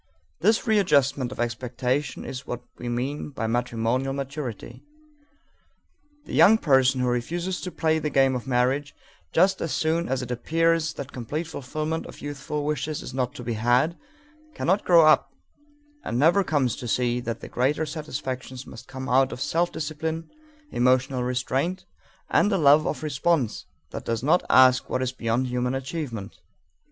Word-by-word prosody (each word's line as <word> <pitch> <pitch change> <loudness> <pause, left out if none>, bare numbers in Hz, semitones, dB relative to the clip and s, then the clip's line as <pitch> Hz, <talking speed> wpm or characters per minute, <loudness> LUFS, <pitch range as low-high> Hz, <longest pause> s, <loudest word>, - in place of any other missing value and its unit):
This 220 0 +2
readjustment 140 - +2
of - - -9
expectation 125 +3 -2
is 130 0 -7
what 120 0 -5 0.2
we 120 - -4
mean 130 +6 -3
by 135 -5 -4
matrimonial 120 +3 0
maturity. 140 -3 -6 1.4
The - - -9
young 220 +2 +7
person 130 - +3
who 125 - +1
refuses 170 +10 -2
to 180 - -5
play 160 0 +1
the 150 - -2
game 135 -1 +3
of 125 0 -4
marriage, 130 +3 0 0.4
just 190 +3 +3
as 165 - -2
soon 165 +2 0
as 130 -1 -1
it 125 - -6
appears 165 +5 +1
that 140 0 -7
complete 145 +7 -4
fulfillment 155 +2 -4
of - - -12
youthful 145 +1 -4
wishes 150 0 -2
is - - -8
not 125 -1 -2
to 125 - -7
be 120 0 -2
had, 120 +9 +2 0.6
cannot 190 +4 +1
grow 170 -3 +7
up 155 - +4 0.7
and 120 - -2
never 170 +9 +4
comes 140 -9 +1
to 125 - -6
see 120 +2 +1
that 115 -2 -5
the - - -7
greater 145 +5 0
satisfactions 130 -4 -5
must - - -11
come 130 0 -7
out 135 0 +3
of - - -6
self 170 +5 0
discipline, 160 +1 -4 0.4
emotional 130 +1 +2
restraint, 130 +9 -1 0.5
and 205 - +3
a 195 - +2
love 150 -1 +5
of 155 - -3
response 145 -3 0 0.2
that - - -6
does 115 0 -2
not 160 +6 +4
ask 130 0 +5
what 130 - 0
is 125 - -1
beyond 120 0 -1
human 125 +1 -1
achievement. 130 -6 -5
135 Hz, 165 wpm, -25 LUFS, 125-155 Hz, 1.4 s, young